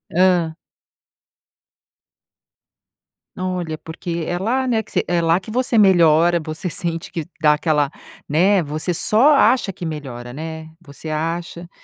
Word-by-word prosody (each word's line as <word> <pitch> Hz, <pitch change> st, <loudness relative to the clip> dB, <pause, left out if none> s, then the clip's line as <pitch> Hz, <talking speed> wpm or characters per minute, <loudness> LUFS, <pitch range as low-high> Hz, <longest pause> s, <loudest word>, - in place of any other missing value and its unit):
Hã. 180 Hz, -3 st, +3 dB, 2.8 s
Olha, 180 Hz, -4 st, -3 dB
porque 165 Hz, 0 st, -5 dB
é 175 Hz, -, -2 dB
lá, 250 Hz, +7 st, 0 dB
né, 230 Hz, -3 st, +1 dB
que 215 Hz, -, -20 dB
você -, -, 0 dB
é 175 Hz, -1 st, 0 dB
lá 165 Hz, +1 st, +3 dB
que 190 Hz, +3 st, -11 dB
você 245 Hz, 0 st, 0 dB
melhora, 170 Hz, -3 st, +5 dB
você 155 Hz, +4 st, -5 dB
sente 165 Hz, 0 st, -4 dB
que 165 Hz, -3 st, -3 dB, 0.2 s
dá 150 Hz, -1 st, +5 dB
aquela 150 Hz, -2 st, +1 dB, 0.4 s
né. 180 Hz, +5 st, +3 dB
Você 155 Hz, +4 st, -3 dB
só 225 Hz, -, +4 dB
acha 250 Hz, -7 st, +3 dB
que 175 Hz, -, -7 dB
melhora, 130 Hz, -6 st, -7 dB
né. 160 Hz, +2 st, -7 dB
Você 155 Hz, 0 st, -11 dB
acha 170 Hz, +2 st, -4 dB
170 Hz, 135 wpm, -20 LUFS, 155-185 Hz, 2.8 s, melhora